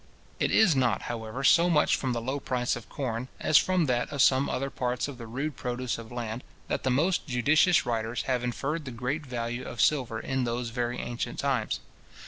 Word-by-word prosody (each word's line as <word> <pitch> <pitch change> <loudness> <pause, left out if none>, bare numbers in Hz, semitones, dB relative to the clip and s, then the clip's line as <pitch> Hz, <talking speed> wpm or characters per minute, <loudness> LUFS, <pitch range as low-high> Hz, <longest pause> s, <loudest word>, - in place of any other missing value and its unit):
It - - +2
is 195 -9 +5
not, 120 -6 +1
however, 115 +3 -5
so 170 +5 +5
much 150 -3 +4
from 130 - -2
the 120 -1 -2
low 135 +4 -2
price 125 -2 -1
of 120 - -9
corn, 125 -2 -3
as 155 - +5
from 185 -3 +2
that 125 -3 0
of 140 -2 +3
some 135 +1 +4
other 135 +1 -2
parts 125 0 -1
of 135 -3 -8
the 115 - -7
rude 135 +5 -3
produce 125 -1 -3
of 115 0 -10
land, 120 0 -4 0.3
that - - -1
the 130 - 0
most 160 +10 +1
judicious 145 +8 +4
writers 115 0 -1
have 125 -2 0
inferred 145 +6 -2
the - - -5
great 125 +6 -3
value 120 -2 -4
of 120 - -8
silver 125 -7 +2
in 130 +2 -1
those 120 0 -2
very 120 +1 -2
ancient 120 0 -4
times. 130 -6 -1
125 Hz, 205 wpm, -28 LUFS, 120-140 Hz, 0.3 s, is